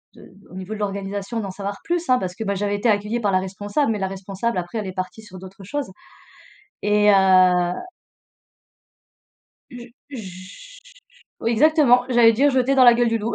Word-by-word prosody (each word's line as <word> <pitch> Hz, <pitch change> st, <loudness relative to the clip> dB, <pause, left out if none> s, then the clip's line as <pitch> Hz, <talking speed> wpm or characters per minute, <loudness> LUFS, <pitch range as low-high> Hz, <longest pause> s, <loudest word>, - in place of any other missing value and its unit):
de -, -, -15 dB, 0.3 s
au -, -, -13 dB
niveau 190 Hz, +3 st, -7 dB
de 215 Hz, -, -7 dB
l'organisation, 200 Hz, +2 st, -4 dB
d'en 195 Hz, -3 st, -5 dB
savoir 200 Hz, +1 st, -6 dB
plus, 345 Hz, -2 st, -3 dB
hein, 255 Hz, -, +5 dB
parce 180 Hz, -4 st, -5 dB
que, -, -, -5 dB
ben, 200 Hz, -1 st, -2 dB
j'avais 205 Hz, +1 st, -2 dB
été 210 Hz, +3 st, 0 dB
accueillie 210 Hz, +3 st, 0 dB
par 205 Hz, -4 st, 0 dB
la 185 Hz, -, +2 dB
responsable 205 Hz, +8 st, -2 dB
mais 215 Hz, -, -3 dB
la 190 Hz, -, -1 dB
responsable 195 Hz, +3 st, -4 dB
après 175 Hz, +4 st, -4 dB
elle 210 Hz, -, -5 dB
est 185 Hz, -, -6 dB
partie 185 Hz, +4 st, -6 dB
sur 200 Hz, -3 st, -13 dB
d'autres 190 Hz, +1 st, -13 dB
choses 280 Hz, +4 st, -5 dB, 0.9 s
et 210 Hz, 0 st, +2 dB
heu -, -, +4 dB, 2.6 s
Je 245 Hz, -1 st, -10 dB, 0.2 s
je 225 Hz, -, -11 dB, 0.6 s
oui, 230 Hz, -, -1 dB
exactement, 250 Hz, -1 st, +4 dB
j'allais 240 Hz, -2 st, +5 dB
dire 275 Hz, +6 st, +2 dB
«jeter 260 Hz, +1 st, +1 dB
dans 260 Hz, -, +6 dB
la 240 Hz, -1 st, +8 dB
gueule 240 Hz, 0 st, +1 dB
du 230 Hz, 0 st, 0 dB
loup», 220 Hz, +2 st, -3 dB
210 Hz, 190 wpm, -21 LUFS, 195-240 Hz, 2.6 s, la